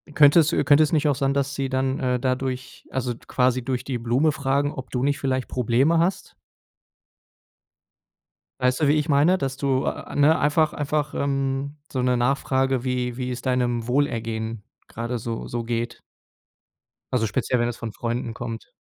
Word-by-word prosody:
könnte 145 +2 +7
es 160 +1 +1
könnte 150 -2 +5
es 155 - 0
nicht 155 -1 +3
auch 145 - +2
sein, 135 0 0
dass 140 0 -1
sie 135 -1 -1
dann, 130 0 0
äh, 125 -1 0
dadurch 130 0 -3
also, 125 -2 -1
quasi 125 -1 +1
durch 125 0 -2
die 130 -2 -3
Blume 125 +7 +2
fragen, 140 +1 0
ob 130 -1 -8
du 125 0 -1
nicht 140 +1 +1
vielleicht 130 -2 -1
Probleme 130 +7 +2
hast? 175 +3 -1 2.3
Weißt 125 +3 +1
du, 145 - +4
wie 145 - +5
ich 155 0 0
meine? 150 +7 +4
Dass 135 -3 -3
du, 135 -1 0
a - - -2
a - - -10
ne, 145 +3 +5
einfach 150 +1 +2
einfach, 150 0 -1
ähm, 135 +1 -1
so 130 - -1
'ne 125 0 +2
Nachfrage, 130 0 +1
wie 125 -2 -2
wie 125 -1 -3
es 125 - -5
deinem 120 -2 0
Wohlergehen 115 -5 -1 0.2
gerade 120 +2 -4
so 115 0 -5
so 120 0 -3
geht 115 0 -3 1.1
also, 115 -3 +2
speziell, 125 +3 0
wenn 120 - +1
es 120 - -6
von 115 -2 -6
Freunden 120 0 -3
kommt. 115 -1 -6
130 Hz, 180 wpm, -24 LUFS, 120-140 Hz, 2.3 s, könnte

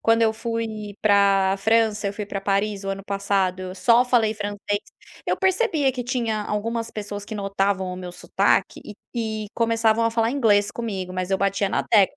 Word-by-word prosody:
quando 225 0 +3
eu 220 -1 +4
fui 220 -2 -4
pra 200 -2 +4
França, 220 -2 +2
fui 210 0 -5
pra 200 -1 -5
Paris 200 0 -1
o - - -4
ano 195 0 -4
passado, 190 -2 -1
só 240 +4 +4
falei 230 -3 +2
francês, 205 0 -3 0.5
eu - - +1
percebia 375 - +2
que 250 -1 -5
tinha 230 -4 -1
algumas 230 +2 -2
pessoas 205 -1 -6
que 215 - -7
notavam 195 -2 -1
o - - -6
meu 180 -1 -7
sotaque - - 0
e 210 - -8 0.3
e 220 -2 -3
começavam 230 -1 +2
a 230 - +2
falar 230 0 +1
inglês 210 -7 +3
comigo, 195 -6 -4
mas 185 +1 -3
eu 190 - +2
batia 195 0 +1
na - - 0
tecla, 210 +6 +3
210 Hz, 185 wpm, -23 LUFS, 195-230 Hz, 0.5 s, eu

